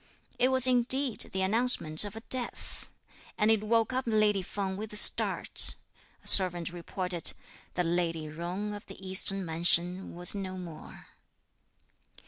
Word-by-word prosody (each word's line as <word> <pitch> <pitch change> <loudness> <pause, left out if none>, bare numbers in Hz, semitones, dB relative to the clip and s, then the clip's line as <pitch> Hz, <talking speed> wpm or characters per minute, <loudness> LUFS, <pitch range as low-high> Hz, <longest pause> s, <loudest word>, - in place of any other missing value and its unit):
It 250 - +3
was 260 -1 +6
indeed 255 0 +3
the 190 0 -3
announcement 200 -7 +2
of 205 0 -8
a 225 - -9
death; 245 +1 -7 0.5
and 210 +1 +1
it 215 -1 0
woke 225 +2 -1
up 260 +1 -3
lady 215 -3 +1
Feng 190 +1 -6
with 215 +2 -8
a - - -8
start. 210 - +3 0.5
A - - -11
servant 175 -3 +5
reported 180 0 -4 0.4
that 180 - -2
lady 165 -1 -2
Jung 175 +7 -7
of 205 - -10
the 195 - -12
eastern 190 0 +2
mansion 175 +3 -1
was 175 +1 +2
no 190 -2 -7
more. 170 -4 -12
195 Hz, 145 wpm, -28 LUFS, 175-220 Hz, 0.5 s, was